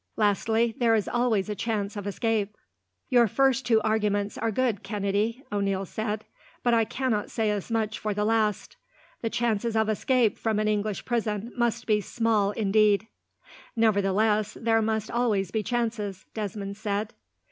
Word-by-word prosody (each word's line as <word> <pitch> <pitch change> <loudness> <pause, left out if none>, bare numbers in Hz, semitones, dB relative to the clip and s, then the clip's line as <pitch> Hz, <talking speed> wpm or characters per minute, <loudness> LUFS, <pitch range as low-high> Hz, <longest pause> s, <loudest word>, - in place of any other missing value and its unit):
Lastly, 220 +2 +2
there 230 -2 +4
is 215 - 0
always 235 -5 +1
a 210 - -2
chance 210 -1 -2
of 205 -1 -5
escape." 210 0 -1 0.5
"Your 240 -2 +5
first 265 +3 +2
two 225 -2 +5
arguments 210 -2 0
are 230 - -1
good, 230 -2 0
Kennedy," 210 +4 -1
O'Neil 195 -1 0
said, 215 +2 -3 0.4
"but 240 - +3
I 225 -1 +4
cannot 235 -4 -1
say 220 -2 0
as 205 0 -3
much 220 -2 -1
for 215 - -2
the 210 +1 0
last. 215 -2 0 0.4
The 225 - -1
chances 230 -1 0
of 220 0 +2
escape 230 +1 +2
from 220 -2 0
an 215 0 +1
English 210 -1 -1
prison 225 -2 -2
must 235 -1 0
be 210 -2 +2
small 220 -2 +1
indeed." 210 0 +3 0.7
"Nevertheless 210 -1 +2
there 225 -1 +2
must 220 -1 -1
always 210 -6 +1
be 220 - 0
chances," 220 -4 -2
Desmond 200 -2 -4
said. 210 0 -2
215 Hz, 160 wpm, -27 LUFS, 205-230 Hz, 0.7 s, Your